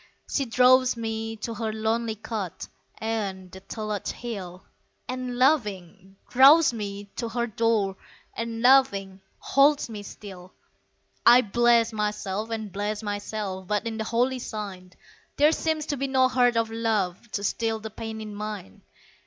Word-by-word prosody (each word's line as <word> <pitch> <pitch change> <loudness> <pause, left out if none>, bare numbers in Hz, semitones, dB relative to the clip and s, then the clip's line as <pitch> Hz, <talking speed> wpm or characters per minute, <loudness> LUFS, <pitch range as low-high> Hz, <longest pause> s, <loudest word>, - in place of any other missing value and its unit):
She 275 - 0
draws 255 +1 +4
me 225 0 -3
to 230 - -3
her 220 0 -3
lonely 220 +1 -1
cot 205 -4 -5 0.3
Ayont 200 -5 -3
the 190 - -10
Tulloch 210 +1 -5
Hill; 190 -6 -6 0.4
And, 255 -1 -4
laughing, 200 - 0
draws 275 +3 +7
me 200 -2 -6
to 235 -2 -3
her 235 +1 -1
door 220 -4 0 0.4
And, 230 0 -4
laughing, 200 -8 +4 0.2
holds 285 -1 +3
me 215 -2 -6
still. 190 -3 -11 0.7
I 245 +1 +8
bless 235 +1 +3
myself 210 0 -2
and 220 -3 -4
bless 205 +2 -3
myself, 205 -2 -4
But 210 +3 -1
in 225 -1 -4
the - - 0
holy 245 +3 0
sign, 195 -6 -7 0.4
There 295 +2 +5
seems 315 -1 -1
to 290 -2 -2
be 275 +1 -1
no 260 -1 +3
heart 245 -2 +3
of 225 -1 0
love, 225 -3 -1
To 200 - -2
still 225 +2 -1
the 220 0 -7
pain 220 0 -6
in 215 -1 -7
mine. 210 - -7
220 Hz, 150 wpm, -26 LUFS, 205-240 Hz, 0.7 s, I